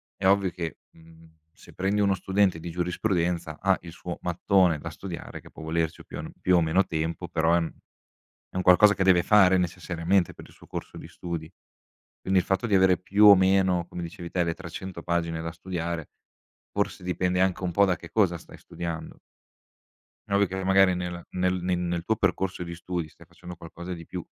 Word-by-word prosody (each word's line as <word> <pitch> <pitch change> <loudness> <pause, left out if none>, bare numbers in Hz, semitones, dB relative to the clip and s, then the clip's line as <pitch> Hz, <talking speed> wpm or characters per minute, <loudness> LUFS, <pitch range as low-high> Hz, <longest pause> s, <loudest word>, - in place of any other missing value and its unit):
è 95 - 0
ovvio 100 -1 +3
che, 85 -3 -5
mhmm, 80 0 -19 0.2
se - - -17
prendi 100 +2 0
1 100 -1 +3
studente 95 -1 +1
di 85 - -7
giurisprudenza, 85 -2 -1
ha 95 0 +2
il 85 - -10
suo 85 +1 -7
mattone 90 -1 +2
da - - -6
studiare, 90 -3 -8
che - - -15
può 80 - -11
volerci 80 0 -2
più - - -9
an - - -7
più 90 - +3
o 85 - +4
meno 80 +5 +3
tempo, 80 +2 -3
però, 80 0 +1
è - - +4
un 85 -2 -1 0.8
è - - -19
un 95 - -1
qualcosa 100 +3 +6
che 95 - 0
deve 95 -2 +5
fare, 95 -1 +5
necessariamente, 90 +1 0
per - - -12
il - - -19
suo - - -17
corso - - -7
di - - -9
studi. 85 -2 -6 0.7
Quindi, 95 0 +2
il 90 - -2
fatto 95 +5 0
di 105 - -1
avere, 95 -1 +5
più 100 +3 +3
o 100 -1 +11
meno, 95 -2 +3
come 90 - -7
dicevi 85 0 -7
te, 90 - +1
le 85 -1 -2
300 90 0 -8
pagine 85 -1 -1
da 80 0 -4
studiare, 85 -2 -5 0.6
forse, - - -2
dipende 90 0 0
anche 95 0 +1
un 90 - -1
po' 100 +4 +4
da 95 - +1
che 85 - -11
cosa 95 -6 +2
stai - - -14
studiando. 85 -2 -7 1.1
È - - -6
ovvio 100 0 +4
che 95 +1 -4
n - - -5
magari, 95 -1 +5
nella 90 -1 -5
nel 90 0 0
nel 90 -1 0
nel 85 -1 -2
tuo 110 - +1
percorso 95 -3 -1
di 85 0 -6
studi, 85 -2 -4
stai - - -18
facendo 90 0 -11
qualcosa 85 +2 -8
di 85 -1 -10
più, 90 -2 -6
90 Hz, 210 wpm, -26 LUFS, 85-95 Hz, 1.1 s, o